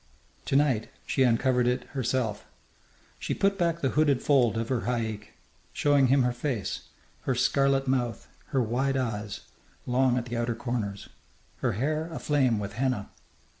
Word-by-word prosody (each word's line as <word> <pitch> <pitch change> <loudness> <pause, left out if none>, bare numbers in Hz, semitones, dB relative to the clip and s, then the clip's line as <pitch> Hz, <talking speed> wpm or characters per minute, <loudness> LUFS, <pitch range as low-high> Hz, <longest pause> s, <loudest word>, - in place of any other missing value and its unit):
To - - -1
night 135 -6 +2 0.2
she - - 0
uncovered 125 0 +3
it 125 0 +1
herself. 120 -5 -2 0.7
She - - -2
put 195 0 +1
back 170 -1 +1
the 135 - +2
hooded 145 -4 +2
fold 125 -6 +3
of 115 0 -2
her 130 -3 -1
haik, 110 -4 -3 0.4
showing 145 -2 +3
him 135 +1 +4
her 125 0 +1
face, 120 -5 -3 0.4
her 130 - +1
scarlet 135 +2 +2
mouth, 120 -4 -1 0.2
her 130 -2 +1
wide 130 +4 0
eyes, 105 -5 -3 0.4
long 125 0 +2
at 120 - -2
the 120 -1 -4
outer 120 0 -1
corners, 110 -5 -4 0.5
her - - 0
hair 155 - -1
aflame 140 -7 +1
with 100 -1 -4
henna. 125 -3 -1
125 Hz, 155 wpm, -28 LUFS, 115-135 Hz, 0.7 s, him